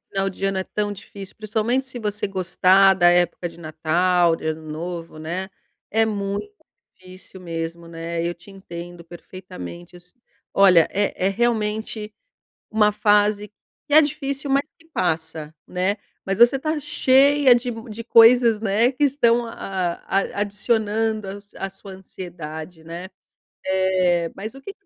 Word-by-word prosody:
final 195 0 -1
de 195 - -7
ano 195 -1 0
é 190 - -2
tão 205 -1 -2
difícil, 195 0 -11
principalmente 220 +5 -1
se 250 -1 -7
você 210 -1 -2
gostar 190 0 +4
da 175 -1 +5
época 175 0 +1
de 170 - -16
Natal, 170 +2 +1
de 160 - -8
Ano 160 0 -3
Novo, 165 0 -6
né. 175 +5 -4 0.4
É 225 +1 +3
muito 200 - -3 0.4
difícil 185 0 -15
mesmo, 165 -1 -5
né, 165 0 -4
eu 175 - -2
te 175 +3 -17
entendo 175 -3 -10
perfeitamente, 125 - -10
eu 175 - -12
se 180 +1 -17 0.4
olha, 185 -4 +6
é 195 -2 -1
é - - +4
realmente 215 -1 -1 0.6
uma 215 -1 +4
fase 210 0 +2
que 215 +6 -18
é 310 - +10
difícil, 275 -1 -3
mas 280 +2 +1
que 325 - -23
passa, 160 -2 -2
né. 185 +3 -1 0.3
Mas 195 +1 -2
você 240 +3 +6
está 310 +3 -2
cheia 280 -2 +4
de 245 +1 -1
m 225 -1 -6
de 230 +2 -6
coisas, 230 -1 +6
né, 225 +4 +2
que 290 +3 0
estão 240 -4 +3
a 230 - -8 0.5
a 195 +1 -1
adicionando 215 0 0
a - - -4
s 200 0 -19
a 195 - -4
sua 195 0 -12
ansiedade, 170 -3 -9
né. 170 +3 -7 0.6
É, 185 -3 +1
mas 215 +4 -6
o 270 - -12
que 400 - -7
195 Hz, 160 wpm, -22 LUFS, 175-225 Hz, 0.6 s, é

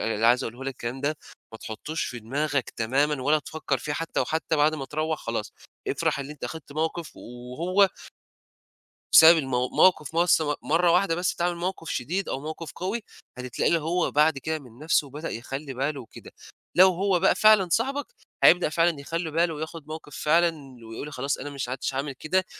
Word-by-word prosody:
اللي 115 0 0
عايز 120 +2 +4
أقوله 120 +4 -7
لك 135 - -2
الكلام 120 +3 -5
ده 145 +2 -1 0.4
ما 110 - -9
تحطّوش 150 +10 -5
في 120 - -5
دماغك 140 +4 -2
تمامًا 135 +5 0
ولا 150 +4 +3
تفكّر 150 -2 -3
فيه 145 +4 -4
حتّى، 165 +2 -2
وحتى 160 0 -1
بعد 150 +1 +3
ما 140 - -5
تروّح 155 +2 -2
خلاص 115 -2 -4 0.4
افرح - - 0
اللي 140 +1 -5
أنت 150 - -9
أخدت 160 -3 -7
موقِف 160 +2 -3
و - - -12 0.3
وهو 185 +6 +3 1.3
بسبب 165 +1 +9
المو 125 -4 0
موقِف 160 -1 +3
مس 170 -1 +4
م 150 -1 0
مرّة 170 +3 +3
واحدة 180 -1 +3
بس 175 +1 -1
تعمل 175 0 0
موقِف 170 -1 -4
شديد 180 +10 -2
أو - - -2
موقِف 155 +2 -6
قوي، 200 +5 -3 0.3
هتتلاقيه 125 -1 -2
اللي 165 -1 +2
هو 175 +2 0
بعد 150 0 +3
كده 160 +4 -3
من 125 -4 -16
نَفْسه 155 -2 +1
بدأ 150 +4 -6
يخلّي 135 +4 -6
باله 140 +2 -2
وكده. 115 - -13 0.4
لو 185 +2 +8
هو 185 0 +1
بقى 190 - +3
فعلًا 215 -4 +5
صاحبك، 270 +8 0 0.4
هيبدأ 175 -3 +6
فعلًا 165 -1 +1
يخلّي 165 +3 -4
باله 165 +1 +1
وياخُد 155 0 -7
موقِف 155 -2 -8
فعلًا 165 +2 +3 0.3
ويقول 115 +7 -7
خلاص 135 +2 -2
أنا 145 - -6
مش 140 -3 -5
عدتش 130 +1 -3
هاعمل 135 +1 -3
كده 185 +8 0
155 Hz, 190 wpm, -26 LUFS, 135-170 Hz, 1.3 s, بسبب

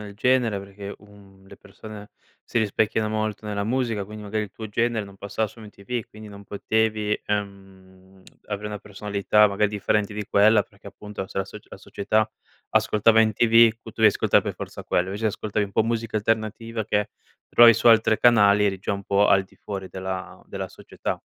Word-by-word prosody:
nel 100 -1 -10
genere 120 -2 +1
perché, 100 +1 -9
uhm, 100 -2 -19
le - - -14
persone 105 +1 -12 0.3
si 120 - -2
rispecchiano 110 0 0
molto 110 0 -3
nella 100 -1 -2
musica, 115 -2 -1
quindi 105 +1 -10
magari 105 +1 -2
il 100 - -12
tuo 110 +2 -8
genere 115 0 0
non 100 -1 -14
passava 100 +2 -2
su 110 +2 -15
MTV, 110 +2 -6
quindi 110 0 -12
non 100 0 -11
potevi, 110 +1 -1
ehm, 95 -2 -7 0.2
avere 105 0 -4
una 105 -1 -5
personalità, 105 +1 +1
magari, 100 +1 +1
differente 105 +1 0
di 105 -1 -4
quella 105 +1 +5
perché 100 0 -15
appunto 105 -1 -8
se - - -5
la 95 - 0
soc 95 - -12
la - - -10
società 110 +2 -1 0.4
ascoltava 110 +1 +3
MTV 115 +2 +5
q 115 +1 -17
tu 110 - -8
devi 110 -1 +5
ascoltare - - +2
per - - -4
forza - - -8
quello, 90 - 0
invece 100 +3 -6
se 110 - +3
ascoltavi 105 0 -2
un 100 - -11
po' 110 +3 +2
musica 115 -1 -2
alternativa 110 +1 -2
che 105 -1 -1 0.4
trovavi 120 -1 +8
su - - -1
altre 110 -1 +5
canali 105 -4 +5
eri 95 -2 0
già 95 - -3
un 100 0 -4
po' 100 +1 +3
al 95 -1 +5
di 95 - -24
fuori 95 -2 -7
della 95 -1 -6
della - - -5
società. - - -6
105 Hz, 195 wpm, -24 LUFS, 100-110 Hz, 0.4 s, trovavi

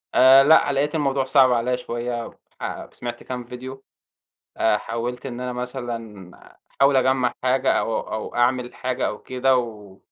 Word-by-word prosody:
آآ 135 +1 +8
لأ، 160 0 +5
لقيت 145 +3 0
الموضوع 135 -3 +1
صعب 130 -1 +5
عليَّ 125 +1 0
شوية، 120 -1 -4 0.6
فسمعت 120 -1 -7
كام 125 -1 -5
فيديو، 130 +2 -9 0.7
آآ 110 -1 +3
حاولت 120 +4 -5
إن 125 -1 -6
أنا 125 0 -3
مثلًا 120 -6 -6 0.5
أحاول 140 0 +5
أجمَّع 130 -1 +2
حاجة 130 +1 +2
أو 115 - 0
أو 110 - -6
أعمل 125 0 +1
حاجة 130 0 -2
أو 105 - -4
كده، 130 0 +1
و 105 -5 -5
125 Hz, 150 wpm, -23 LUFS, 120-130 Hz, 0.7 s, آآ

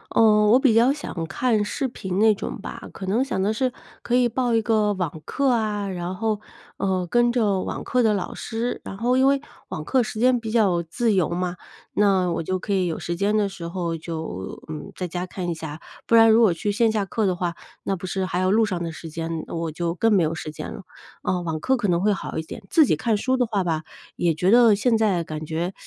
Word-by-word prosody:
嗯， 210 -2 +5
我 245 - +7
比 265 -5 +4
较 240 +4 +5
想 190 - -5
看 220 +1 +1
视 240 +6 -2
频 190 -6 -5
那 220 0 +6
种 200 - -5
吧。 - - -7
可 195 - -7
能 220 +7 +2
想 230 - -2
的 200 +2 +1
是， 255 +2 0 0.3
可 240 - 0
以 245 -1 +4
报 245 +1 0
一 225 - +3
个 215 -2 +2
网 180 -4 -4
课 280 -1 0
啊， 210 -4 0
然 180 0 -4
后， 215 +1 -1 0.4
呃， 185 -2 0
跟 240 +6 +3
着 215 -6 +1
网 - - -4
课 250 - +1
的 220 -2 +3
老 195 -3 -3
师。 230 +2 -3
然 - - -6
后 245 +4 +1
因 265 +1 +4
为 275 0 +3 0.3
网 155 - -5
课 255 +11 +2
时 220 - -6
间 250 +2 +3
比 225 -1 -6
较 205 -6 +2
自 220 +7 0
由 185 -6 +2
嘛， 180 +1 -2 0.4
那 190 -3 +3
我 165 - -1
就 185 +3 -1
可 185 - -6
以 190 -2 +2
有 165 - -2
时 170 0 -4
间 205 +3 +1
的 210 -2 +2
时 175 -3 -7
候 170 -1 -3
就， 160 - -6
嗯， 155 -1 -7
在 180 -1 -4
家 175 +2 -3
看 180 -1 -5
一 - - 0
下， 160 -1 -7 0.2
不 230 - +3
然 225 0 +8
如 220 - +6
果 210 -6 +5
去 205 +5 -2
线 225 +2 +3
下 215 -2 0
课 210 +2 -1
的 185 -2 +1
话， 175 -1 -2 0.3
那 195 - -1
不 185 - -7
是 190 +1 -1
还 180 -1 -2
有 185 0 +2
路 220 +3 +4
上 185 -4 -3
的 165 -1 -3
时 165 +1 -8
间， 165 0 -4
我 165 -1 -3
就 170 +1 -2
更 225 +5 +2
没 190 -4 +4
有 155 +1 0
时 155 -1 -6
间 150 - -7
了。 - - -9 0.4
呃， 180 -1 0
网 165 -2 -3
课 265 +12 +2
可 210 -6 -1
能 170 0 +2
会 210 +1 +3
好 - - -5
一 - - 0
点， 160 - -9
自 315 - +5
己 160 - +2
看 215 +7 0
书 260 +5 +1
的 250 -1 +2
话 205 -5 -1
吧， 160 -2 -1 0.3
也 170 -2 +1
觉 180 +5 +1
得 235 -2 +7
现 225 +3 +2
在 195 -6 +1
感 155 0 -5
觉， 165 +4 -2
195 Hz, 270 characters per minute, -23 LUFS, 175-225 Hz, 0.4 s, 然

